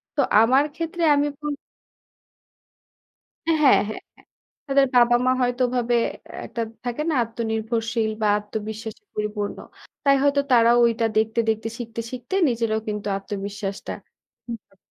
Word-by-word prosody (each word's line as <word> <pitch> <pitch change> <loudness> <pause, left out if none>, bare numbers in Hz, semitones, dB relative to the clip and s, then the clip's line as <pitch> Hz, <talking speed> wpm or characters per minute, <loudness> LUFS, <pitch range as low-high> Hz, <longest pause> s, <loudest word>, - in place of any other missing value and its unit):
তো - - +3 0.2
আমার 260 +5 +5
ক্ষেত্রে 335 +1 -3
আমি 290 +1 +2
বল 295 -1 -3 1.9
হ্যাঁ। 320 -2 +2
হ্যাঁ, 275 - +6
হ্যাঁ। - - -6 0.7
তাদের 275 0 +4
বাবা-মা 240 +1 +5
হয়তো 245 +1 0
ওভাবে 240 -1 0 0.3
অ্যা - - -10
একটা 235 - -4 0.2
থাকে 245 +5 -2
না, 305 - +1
আত্মনির্ভরশীল 225 0 -2
বা 210 - +3
আত্মবিশ্বাসে 220 - -6
পরিপূর্ণ। 210 -1 -3 0.5
তাই 275 0 +6
হয়তো 285 0 +3
তারাও 235 0 +6
ঐটা 230 0 +2
দেখতে, 220 +1 +1
দেখতে 220 +1 -1
শিখতে, 230 -1 -5
শিখতে 255 +8 -5
নিজেরাও 225 -2 0
কিন্তু 210 0 -4
আত্মবিশ্বাসটা 200 0 -5 0.5
হুম। 225 -4 -9
230 Hz, 130 wpm, -23 LUFS, 220-255 Hz, 1.9 s, হ্যাঁ